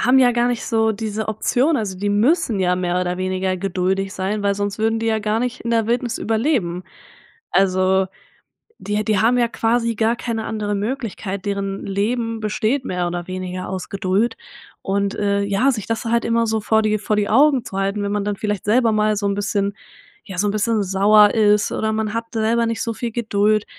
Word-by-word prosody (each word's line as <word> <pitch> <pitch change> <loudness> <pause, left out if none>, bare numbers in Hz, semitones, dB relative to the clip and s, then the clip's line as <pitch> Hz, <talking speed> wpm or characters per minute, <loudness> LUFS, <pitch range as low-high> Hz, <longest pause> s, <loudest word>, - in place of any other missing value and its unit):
haben, 255 +2 +4
ja 250 -1 +5
gar 240 0 +1
nicht 245 -2 -2
so 225 -1 +2
diese 215 0 -4
Option, 250 +8 +1
also 195 -6 -3
die 205 +1 -1
müssen 230 - +2
ja 180 -1 +2
mehr 180 0 0
oder 180 0 -2
weniger 185 0 -1
geduldig 190 +1 -1
sein, 200 +2 -2
weil 200 0 +1
sonst 205 0 -3
würden 225 +1 +1
die 225 - -2
ja 220 -1 +2
gar 215 +2 0
nicht 250 0 -3
in 235 - -3
der 225 -2 +2
Wildnis 240 0 -1
überleben. 220 - 0 0.7
Also 190 0 +2 0.7
die 210 +1 -2
die 210 -2 +2
haben 235 +4 +3
ja 240 - +3
quasi 230 0 0
gar 225 +2 +1
keine 225 -2 -3
andere 210 -2 -2
Möglichkeit, 205 -3 -4
deren 200 -1 -3
Leben 225 +3 -1
besteht 220 +5 -1
mehr 180 -1 -1
oder 175 0 -4
weniger 185 0 -5
aus 185 -1 -5
Geduld 200 +4 0 0.4
und, 200 0 -1
äh, 200 -1 0
ja, 200 +7 +2
sich 215 -5 -4
das 225 +1 -2
halt 235 +1 +1
immer 230 0 +2
so 220 0 0
vor 220 +1 +2
die 215 0 +1
vor 210 +1 -1
die 205 -1 0
Augen 275 +2 +4
zu 195 - -6
halten. 195 +1 -1
Wenn 200 - -2
man 205 -1 -1
dann 205 0 -1
vielleicht 210 -2 -3
selber 230 +2 +3
mal 215 0 +2
so 200 0 -1
'n 200 - +1
bisschen 200 -1 -1 0.5
ja 190 -4 -8
so 205 - +1
'n - - +1
bisschen 215 +1 +1
sauer 205 +2 +5
ist 210 -2 +3
oder 220 0 -1
man 215 -1 -2
hat 230 0 -2
selber 230 +1 +1
nicht 225 0 -2
so 230 -2 -2
viel 235 +1 -4
Geduld, 215 -2 +1
210 Hz, 210 wpm, -20 LUFS, 195-230 Hz, 0.7 s, ja